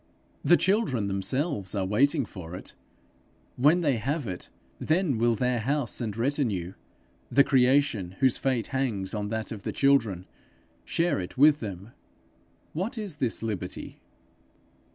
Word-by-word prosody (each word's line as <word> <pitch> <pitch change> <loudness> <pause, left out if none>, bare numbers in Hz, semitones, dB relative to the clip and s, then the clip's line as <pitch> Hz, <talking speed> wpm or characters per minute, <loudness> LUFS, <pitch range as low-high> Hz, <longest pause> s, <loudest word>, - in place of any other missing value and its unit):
The 175 - +6
children 180 - +1
themselves 100 - -2
are 95 -2 0
waiting 135 - +2
for 90 -4 -9
it: - - -8 0.8
when 150 +7 +4
they 145 -7 +2
have 140 +6 -2
it, 90 -4 -6 0.3
then 155 - +1
will 120 0 +3
their 125 +1 0
house 135 +1 -1
and 110 -3 -3
retinue, 115 - -1 0.6
the 140 - +5
creation, 130 -8 +2
whose 130 -2 +4
fate 130 -4 0
hangs 115 -8 -1
on 105 -1 -2
that 110 0 -3
of 110 -3 -6
the - - -3
children, 115 -10 +2 0.6
share 170 -8 0
it 90 +7 -6
with 150 +2 +6
them: 100 0 -7 0.8
what 195 +10 -3
is 200 -8 -4
this 120 -5 -1
liberty? 100 -5 -5
125 Hz, 140 wpm, -27 LUFS, 100-145 Hz, 0.8 s, The